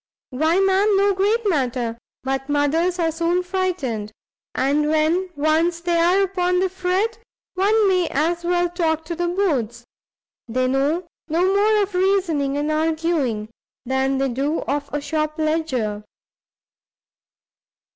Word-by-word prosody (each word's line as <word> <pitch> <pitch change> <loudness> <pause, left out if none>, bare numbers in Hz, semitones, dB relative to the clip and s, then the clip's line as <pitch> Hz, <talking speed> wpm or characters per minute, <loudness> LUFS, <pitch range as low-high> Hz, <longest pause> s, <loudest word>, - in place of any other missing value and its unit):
"Why, 315 +7 +2
ma'am, 390 +1 +3
no 400 0 +3
great 420 +4 +1
matter, 250 - 0 0.3
but 270 +1 -3
mothers 315 +5 +1
are 330 -2 +1
soon 340 +2 0
frightened, 355 - -2 0.4
and 295 +3 +1
when 315 +4 +1
once 315 +3 +1
they 345 0 0
are 355 +4 +3
upon 360 -2 0
the 380 0 +1
fret, 380 +5 -1 0.3
one 410 +3 +3
may 365 -3 +2
as 335 +4 -1
well 350 0 +1
talk 325 -2 -1
to 340 - -4
the 350 +1 -1
boards! 275 - -1 0.6
they 255 +2 0
know 285 +7 0 0.2
no 335 +3 +1
more 420 +1 +3
of 400 0 -6
reasoning 360 -7 +1
and 295 +1 -1
arguing, 310 -8 0 0.4
than 265 +1 0
they 270 0 0
do 280 +6 -1
of 285 0 -3
a 295 - -1
shop 305 +1 -2
ledger! 275 -10 -1
325 Hz, 135 wpm, -21 LUFS, 280-365 Hz, 0.6 s, ma'am